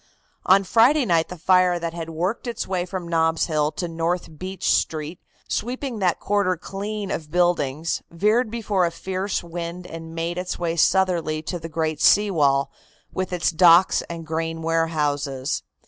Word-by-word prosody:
On 195 Hz, +2 st, +6 dB
Friday 245 Hz, +8 st, +4 dB
night 165 Hz, -5 st, +2 dB
the 180 Hz, -, -7 dB
fire 180 Hz, +1 st, +3 dB
that 170 Hz, -1 st, -4 dB
had 165 Hz, -1 st, -6 dB
worked 180 Hz, +10 st, -2 dB
its 235 Hz, -, -3 dB
way 185 Hz, -1 st, -2 dB
from 180 Hz, -1 st, -5 dB
Nob's 165 Hz, -1 st, +1 dB
Hill 155 Hz, -2 st, 0 dB
to 175 Hz, -, -3 dB
North 165 Hz, -1 st, -3 dB
Beach 185 Hz, 0 st, -4 dB
Street, 155 Hz, +2 st, -1 dB, 0.3 s
sweeping 250 Hz, 0 st, -3 dB
that 180 Hz, -4 st, +1 dB
quarter 200 Hz, -3 st, +1 dB
clean 200 Hz, +3 st, -5 dB
of 155 Hz, -2 st, -4 dB
buildings, 165 Hz, -3 st, 0 dB
veered 215 Hz, +7 st, +1 dB
before 210 Hz, -5 st, 0 dB
a -, -, -1 dB
fierce 190 Hz, +3 st, -3 dB
wind 170 Hz, +1 st, -6 dB
and 165 Hz, -1 st, -9 dB
made 170 Hz, +2 st, -2 dB
its 180 Hz, 0 st, -4 dB
way 170 Hz, -1 st, -2 dB
southerly 170 Hz, -3 st, +2 dB
to 175 Hz, +2 st, -4 dB
the 165 Hz, 0 st, -7 dB
great 155 Hz, -1 st, -2 dB
sea 205 Hz, 0 st, +5 dB
wall, 140 Hz, -4 st, +2 dB, 0.4 s
with 185 Hz, -1 st, -3 dB
its 180 Hz, -1 st, +1 dB
docks 175 Hz, +1 st, +5 dB
and 165 Hz, -1 st, -6 dB
grain 165 Hz, +1 st, -3 dB
warehouses. 150 Hz, -4 st, -1 dB
170 Hz, 165 wpm, -23 LUFS, 165-190 Hz, 0.4 s, On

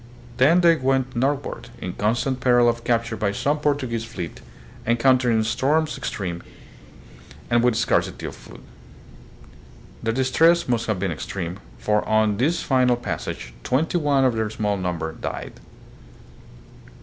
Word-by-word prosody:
Then 160 Hz, +8 st, +5 dB
they 170 Hz, -1 st, +5 dB
went 130 Hz, -1 st, 0 dB
northward, 135 Hz, +3 st, -2 dB
in 90 Hz, -, -5 dB
constant 120 Hz, +5 st, 0 dB
peril 120 Hz, -1 st, +4 dB
of 120 Hz, 0 st, 0 dB
capture 115 Hz, -1 st, 0 dB
by 105 Hz, -2 st, 0 dB
some 145 Hz, +8 st, 0 dB
Portuguese 135 Hz, -6 st, -1 dB
fleet, 90 Hz, -8 st, -7 dB, 0.5 s
encountering 120 Hz, -1 st, +3 dB
storms 150 Hz, +7 st, +1 dB, 1.6 s
and 120 Hz, 0 st, +4 dB
with 120 Hz, -2 st, +3 dB
scarcity 115 Hz, -, 0 dB
of -, -, -6 dB
food. -, -, -14 dB, 1.4 s
Their 115 Hz, -, 0 dB
distress 160 Hz, +8 st, +3 dB
must 120 Hz, -2 st, 0 dB
have 110 Hz, -3 st, 0 dB
been 95 Hz, -1 st, -1 dB
extreme, 85 Hz, +3 st, -5 dB, 0.2 s
for 105 Hz, 0 st, +1 dB
on 110 Hz, -1 st, +2 dB
this 155 Hz, +9 st, +1 dB
final 125 Hz, -2 st, +3 dB
passage -, -, -5 dB
twenty 155 Hz, +7 st, +1 dB
one 140 Hz, -3 st, +2 dB
of 130 Hz, -, +3 dB
their 110 Hz, -1 st, -1 dB
small 105 Hz, -1 st, -1 dB
number 90 Hz, -4 st, -3 dB
died. -, -, -6 dB
120 Hz, 135 wpm, -23 LUFS, 110-135 Hz, 1.6 s, Then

